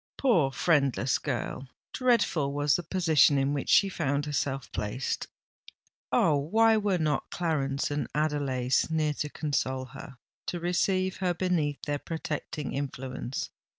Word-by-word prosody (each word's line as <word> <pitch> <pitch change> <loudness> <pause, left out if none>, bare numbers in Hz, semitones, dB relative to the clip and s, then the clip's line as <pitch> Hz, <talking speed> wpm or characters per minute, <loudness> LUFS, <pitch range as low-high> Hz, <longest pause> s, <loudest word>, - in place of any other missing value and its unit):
Poor 175 - +3
friendless 135 -4 +2
girl! 135 -1 -4 0.3
dreadful 220 - +2
was 145 0 +2
the - - 0
position 160 -4 +3
in 135 +1 +1
which 140 - -3
she 200 - +6
found 145 -6 -1
herself 135 -2 -2
placed! 105 +5 -3 0.8
Oh! 150 - +4
why 220 +10 +3
were 205 -3 +1
not 155 -4 -1
Clarence 145 -5 -1
and 145 0 -1
Adelais 140 -4 +1
near 155 -2 +1
to 150 0 -3
console 130 -4 -2
her—to 135 +6 -9
receive 185 +2 0
her 180 -2 0
beneath 165 -6 -1
their 145 -1 -2
protecting 150 -3 -4
influence? 135 -2 -4
150 Hz, 130 wpm, -28 LUFS, 135-175 Hz, 0.8 s, she